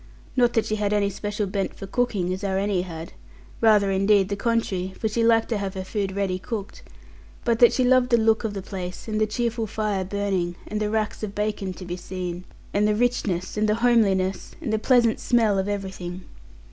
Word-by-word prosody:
Not 245 Hz, -2 st, +3 dB
that 225 Hz, -, +2 dB
she 215 Hz, -, -1 dB
had 205 Hz, 0 st, 0 dB
any 200 Hz, -1 st, +2 dB
special 205 Hz, +2 st, -3 dB
bent 195 Hz, 0 st, -2 dB
for -, -, -7 dB
cooking, 200 Hz, -4 st, 0 dB
as 190 Hz, +2 st, -6 dB
our 190 Hz, -1 st, 0 dB
Annie 195 Hz, -2 st, +1 dB
had; 165 Hz, -2 st, -7 dB, 0.5 s
rather 210 Hz, -3 st, +5 dB
indeed 195 Hz, 0 st, +3 dB
the 200 Hz, -, -1 dB
contrary, 195 Hz, -4 st, -1 dB
for 220 Hz, -, 0 dB
she 230 Hz, +2 st, 0 dB
liked 225 Hz, -1 st, +4 dB
to 225 Hz, -3 st, 0 dB
have 195 Hz, -1 st, -4 dB
her 190 Hz, -, -3 dB
food 195 Hz, 0 st, -2 dB
ready 190 Hz, -2 st, -1 dB
cooked; 205 Hz, 0 st, -6 dB, 0.6 s
but 230 Hz, -1 st, +2 dB
that 240 Hz, -, +8 dB
she 255 Hz, -, +1 dB
loved 250 Hz, 0 st, +4 dB
the 235 Hz, -, +5 dB
look 220 Hz, 0 st, +3 dB
of 215 Hz, -2 st, -3 dB
the 195 Hz, -, -4 dB
place, 185 Hz, -1 st, -6 dB
and 215 Hz, -1 st, -1 dB
the 215 Hz, -, +3 dB
cheerful 230 Hz, 0 st, -1 dB
fire 210 Hz, -2 st, -1 dB
burning, 190 Hz, -3 st, -1 dB
and 210 Hz, -, -3 dB
the 210 Hz, -, 0 dB
racks 215 Hz, 0 st, -1 dB
of 210 Hz, -2 st, -5 dB
bacon 210 Hz, -2 st, -2 dB
to 185 Hz, -, -9 dB
be 175 Hz, 0 st, -4 dB
seen, 180 Hz, -1 st, -5 dB, 0.3 s
and 205 Hz, +1 st, +3 dB
the 210 Hz, -, +2 dB
richness, 215 Hz, -6 st, 0 dB
and 215 Hz, 0 st, +2 dB
the 210 Hz, -, +3 dB
homeliness, 205 Hz, -6 st, +2 dB
and 265 Hz, -10 st, -3 dB
the 220 Hz, -, +2 dB
pleasant 235 Hz, -1 st, +3 dB
smell 220 Hz, -5 st, +2 dB
of 190 Hz, -, -1 dB
everything. 190 Hz, -3 st, -5 dB
205 Hz, 215 wpm, -24 LUFS, 190-225 Hz, 0.6 s, that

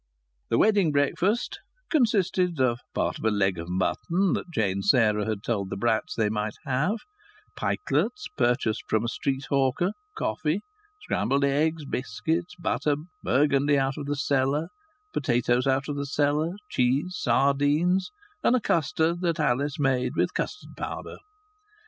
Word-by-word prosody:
The 115 Hz, -, +2 dB
wedding 205 Hz, -7 st, +4 dB
breakfast 180 Hz, -, +1 dB, 0.3 s
consisted 190 Hz, -, +2 dB
of 120 Hz, -2 st, +2 dB, 0.2 s
part -, -, -1 dB
of -, -, -9 dB
a 110 Hz, -, +3 dB
leg 95 Hz, -4 st, +1 dB
of 85 Hz, +1 st, -6 dB
mutton 170 Hz, -, 0 dB
that -, -, -3 dB
Jane 100 Hz, -, 0 dB
Sarah 105 Hz, 0 st, +3 dB
had 110 Hz, -2 st, -3 dB
told 100 Hz, -6 st, -1 dB
the -, -, -4 dB
Bratts 115 Hz, +7 st, 0 dB
they 110 Hz, -2 st, +2 dB
might 105 Hz, 0 st, -2 dB
have, 150 Hz, -, +1 dB, 0.6 s
pikelets 420 Hz, 0 st, -1 dB
purchased 120 Hz, -4 st, +1 dB
from 110 Hz, 0 st, +2 dB
a -, -, 0 dB
street 135 Hz, +3 st, -2 dB
hawker, 140 Hz, +7 st, +2 dB, 0.3 s
coffee, 160 Hz, -, -1 dB, 0.4 s
scrambled 140 Hz, +1 st, 0 dB
eggs, 150 Hz, +3 st, +1 dB
biscuits, 155 Hz, -, -2 dB
butter, 160 Hz, -4 st, 0 dB, 0.3 s
burgundy 140 Hz, +1 st, +3 dB
out 135 Hz, 0 st, +1 dB
of 145 Hz, -1 st, -6 dB
the 145 Hz, -, 0 dB
cellar, 140 Hz, +2 st, +1 dB, 0.4 s
potatoes 125 Hz, -2 st, +1 dB
out 135 Hz, +1 st, +1 dB
of 145 Hz, -1 st, -3 dB
the 140 Hz, 0 st, -3 dB
cellar, 150 Hz, +4 st, +1 dB, 0.2 s
cheese, 135 Hz, +9 st, +1 dB
sardines, 145 Hz, -, +2 dB, 0.3 s
and 250 Hz, -, +4 dB
a -, -, +3 dB
custard 165 Hz, -, +1 dB
that 170 Hz, -1 st, 0 dB
Alice 140 Hz, 0 st, +1 dB
made 130 Hz, -3 st, +1 dB
with -, -, +1 dB
custard 420 Hz, -, -4 dB
powder. -, -, -6 dB
140 Hz, 145 wpm, -26 LUFS, 120-165 Hz, 0.6 s, wedding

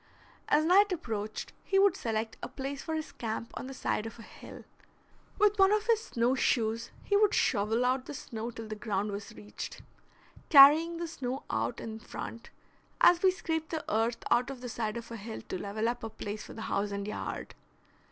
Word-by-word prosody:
As 305 Hz, +1 st, +3 dB
night 395 Hz, +4 st, +5 dB
approached, 220 Hz, -, -4 dB
he 390 Hz, -, +1 dB
would 390 Hz, -2 st, +5 dB
select 225 Hz, -6 st, -2 dB
a -, -, -4 dB
place 275 Hz, +2 st, -5 dB
for 320 Hz, -, -3 dB
his 315 Hz, 0 st, -4 dB
camp 230 Hz, 0 st, -4 dB
on -, -, -6 dB
the 270 Hz, -, -7 dB
side 220 Hz, -3 st, -1 dB
of 225 Hz, -, -10 dB
a 230 Hz, -, -11 dB
hill. -, -, -12 dB, 0.7 s
With 415 Hz, -1 st, +3 dB
one 385 Hz, 0 st, +6 dB
of 425 Hz, 0 st, +2 dB
his 455 Hz, -1 st, +2 dB
snow 240 Hz, +2 st, +1 dB
shoes 230 Hz, -3 st, +1 dB
he 405 Hz, -, +1 dB
would 420 Hz, 0 st, +4 dB
shovel 225 Hz, +2 st, +2 dB
out 255 Hz, +1 st, 0 dB
the 295 Hz, -, -6 dB
snow 230 Hz, -2 st, -5 dB
till 225 Hz, -2 st, -8 dB
the 215 Hz, -, -5 dB
ground 210 Hz, -1 st, -2 dB
was 200 Hz, +2 st, -6 dB
reached, 210 Hz, -1 st, -8 dB, 0.7 s
carrying 310 Hz, +4 st, +8 dB
the 340 Hz, 0 st, -3 dB
snow 265 Hz, -4 st, -4 dB
out 240 Hz, -, -1 dB
in 220 Hz, -1 st, -6 dB
front, 230 Hz, +1 st, -8 dB, 0.5 s
as 350 Hz, 0 st, +6 dB
we 380 Hz, -, +6 dB
scrape 320 Hz, -4 st, -2 dB
the 320 Hz, -2 st, -4 dB
earth 225 Hz, +2 st, 0 dB
out 245 Hz, +2 st, +3 dB
of 265 Hz, -3 st, -7 dB
the 250 Hz, -, -5 dB
side 220 Hz, -1 st, -3 dB
of 235 Hz, 0 st, -8 dB
a 230 Hz, -, -5 dB
hill 220 Hz, +2 st, -7 dB
to 185 Hz, -, -3 dB
level 215 Hz, +2 st, -2 dB
up 240 Hz, 0 st, -2 dB
a 225 Hz, -, -3 dB
place 210 Hz, -1 st, -6 dB
for -, -, -10 dB
the 220 Hz, -, -7 dB
house 205 Hz, -1 st, -1 dB
and 200 Hz, 0 st, -4 dB
yard. 210 Hz, -, -5 dB
240 Hz, 205 wpm, -30 LUFS, 220-320 Hz, 0.7 s, carrying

